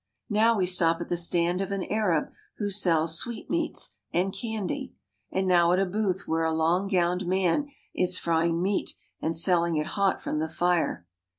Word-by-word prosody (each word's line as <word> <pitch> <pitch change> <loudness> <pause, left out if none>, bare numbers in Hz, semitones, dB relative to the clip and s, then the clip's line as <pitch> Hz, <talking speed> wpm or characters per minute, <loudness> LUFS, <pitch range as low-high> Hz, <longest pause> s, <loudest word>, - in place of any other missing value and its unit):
Now 225 +2 +3
we 185 - +1
stop 170 -2 +3
at 170 - -6
the - - 0
stand 175 +1 +1
of 195 0 -4
an 195 -1 -2
Arab 205 -8 0 0.3
who 205 -2 -2
sells 165 -4 +3
sweet 235 -3 -5
meats 335 -1 -1
and 185 +2 0
candy, 230 +4 -4 0.3
and 190 0 -1
now 175 -1 +4
at - - +2
a 195 - +2
booth 195 0 -1
where 165 0 0
a 160 - +1
long 165 +4 +1
gowned 180 -1 0
man 190 - +1 0.3
is 180 0 +1
frying 165 0 0
meat 195 +1 -1 0.3
and 160 0 -1
selling 170 -1 +2
it 150 0 0
hot 200 -1 +1
from 155 - -3
the 160 +1 -2
fire. 175 - 0
180 Hz, 185 wpm, -26 LUFS, 170-195 Hz, 0.3 s, now